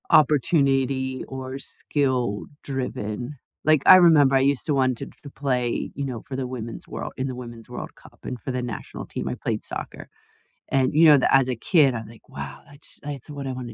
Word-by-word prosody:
opportunity 135 -3 +3
or 130 0 -6
skill-driven. 130 -2 -2 0.3
Like, 155 -2 +4
I - - +11
remember 155 -7 +6
I - - +5
used 140 -1 +2
to 150 - +1
wanted 130 -3 0
to - - -23
f 140 - -10
play, 125 -4 -1
you 140 - -3
know, 125 -5 -4
for 135 - -5
the 130 -1 -3
Women's 115 -3 -7
World - - -6
in 130 - -2
the 130 - -4
Women's 120 -2 -9
World 125 - -7
Cup, - - -18
and 125 - -5
for 130 - -4
the 125 0 -2
national 125 -1 -6
team - - -4
I - - -3
played - - -3
soccer. - - -6 0.6
And, 130 -1 +1
you 160 +3 +6
know, 150 -2 +8
tha 130 - +2
as 135 -1 +4
a 125 - 0
kid, 140 - +3
I'm 110 -1 -5
like, 115 +1 -16
"Wow, - - -7
that's 145 +1 -4
that's 145 0 -6
what 140 -2 -5
I 130 - -3
wanna 125 -2 -7
130 Hz, 205 wpm, -24 LUFS, 125-140 Hz, 0.6 s, I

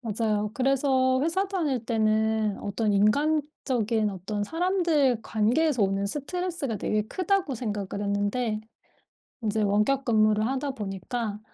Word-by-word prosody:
맞아요. 215 -2 -1
그래서 260 -1 +2
회사 375 +5 0
다닐 295 - -1
때는 220 -2 +1
어떤 205 +1 -1
인간적인 235 -2 +1
어떤 205 +2 -4
사람들 325 - +1
관계에서 245 +6 +1
오는 195 0 +1
스트레스가 295 - -3
되게 215 +2 0
크다고 365 - -1
생각을 205 -3 -4
했는데 215 +2 -1 0.8
인제 215 -1 0
원격 210 +7 +2
근무를 215 -2 +3
하다 270 +2 -2
보니까 210 0 -4
225 Hz, 295 characters per minute, -26 LUFS, 210-275 Hz, 0.8 s, 근무를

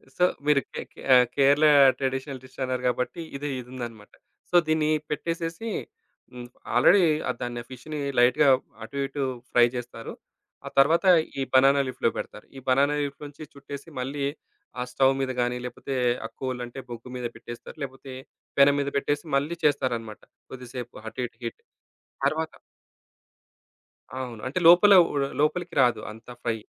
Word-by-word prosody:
So, 180 - +1 0.2
మీరు 150 -2 +4
కే - - -4
కే - - -14
ఆహ్, 125 0 +7
Kerala 145 +2 +4 0.3
traditional 135 0 -3
dish 130 - -16
అన్నారు. 130 -1 -2
గాబట్టి, 125 +7 -2 0.2
ఇది 145 +1 -4
ఇదుందన్నమాట. 120 -4 -9 0.4
సో, - - -2
దీన్ని 155 -1 +2 0.2
పెట్టేసేసి, 165 +7 -3 0.6
హ్మ్. 120 -1 -8 0.3
ఆల్రెడీ 180 +10 +6 0.3
ఆ - - +3
దాన్ని, 120 -1 -4
ఆ - - -29
ఫిష్‌‌ని 150 +4 -7 0.2
లైట్‌గా, 125 +4 +5 0.4
అటు, 140 +5 -9
ఇటు 140 +1 -3 0.3
ఫ్రై 120 -1 +6
జేస్తారు. 120 -2 -6 0.5
ఆ - - -4
తరువాత 160 +6 +4 0.3
ఈ - - 0
బనానా 135 +2 +6
లీఫ్‌లో 130 - 0
బెడతారు. 105 - -7
ఈ - - -6
బనానా 140 +3 +3
లీఫ్‌లో 145 +1 -6
నుంచి 145 +2 -11
చుట్టేసి. 140 +2 -9
మళ్ళీ 140 +2 -3 0.6
ఆ - - +1
స్టోవ్వు 135 +1 +3
మీద 130 -1 -1
గానీ, 120 0 0
లేపోతే 130 +2 -6 0.3
ఆ - - -2
కోల్ 130 -2 -3
అంటే 120 +2 -9
బొగ్గు 120 +1 -8
మీద 125 - -5
పెట్టేస్తారు. 120 +4 -10
లేకపోతే 135 0 -8 0.5
పెనెం 140 +1 +7
మీద 140 - -1
పెట్టేసి. 145 +1 -1
మళ్ళీ 155 +5 -2
చేస్తారన్నమాట. 120 -7 0 0.3
కొద్దిసేపు 125 -1 -8
అటు 125 - -5
ఇటు 115 - -28
హిట్. 115 - -6 0.6
తరవాత 155 +3 0 1.7
అవును. 120 -4 -6
అంటే 140 +7 -2
లోపల 180 +4 +8 0.2
ఉ - - -4 0.3
లోపలికి 170 +3 0
రాదు. 120 -4 +3
అంత 110 +2 -14 0.2
ఫ్రై. 115 -2 0
135 Hz, 155 wpm, -26 LUFS, 125-145 Hz, 1.7 s, లోపల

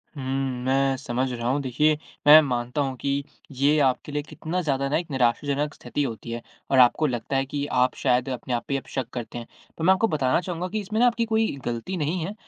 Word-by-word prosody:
हुँ, 140 - -6 0.4
मैं 135 0 +2
समझ 130 0 -2
रहा 120 -1 -3
हूँ। 140 +2 +1
देखिए 150 +4 +2 0.3
मैं 155 +1 +11
मानता 125 0 -2
हूँ 135 -2 -2
कि 140 +2 -1 0.3
ये 140 +3 +2
आपके 135 +1 +1
लिए 145 0 -1
कितना 165 +4 -4
ज़्यादा 140 -3 0
ना - - +2
एक 170 0 -4
निराशाजनक 140 +4 0
स्थिति 145 +4 -3
होती 115 -2 -5
है 120 - -4 0.3
और 130 - +5
आपको 125 +5 +5
लगता 120 0 -3
है 135 - +1
कि 145 +1 -3
आप 125 0 +2
शायद 125 -1 +1
अपने 125 -1 -4
आप 120 - -1
पे - - -2
ही 140 - +2
अब - - -19
शक 130 -3 -3
करते 120 -1 -6
हैं। 120 - -7 0.3
तो 160 - -5
मैं 190 +2 +6
आपको 225 +4 +2
बताना 140 -5 +1
चाहूँगा 180 0 -4
कि 215 +3 -3
इसमें 215 +3 -3
ना 245 - +6
आपकी 235 -1 +1
कोई 220 0 +1 0.2
गलती 120 +11 -3
नहीं 160 +3 -1
है। 200 - -5
140 Hz, 235 wpm, -25 LUFS, 125-155 Hz, 0.4 s, मैं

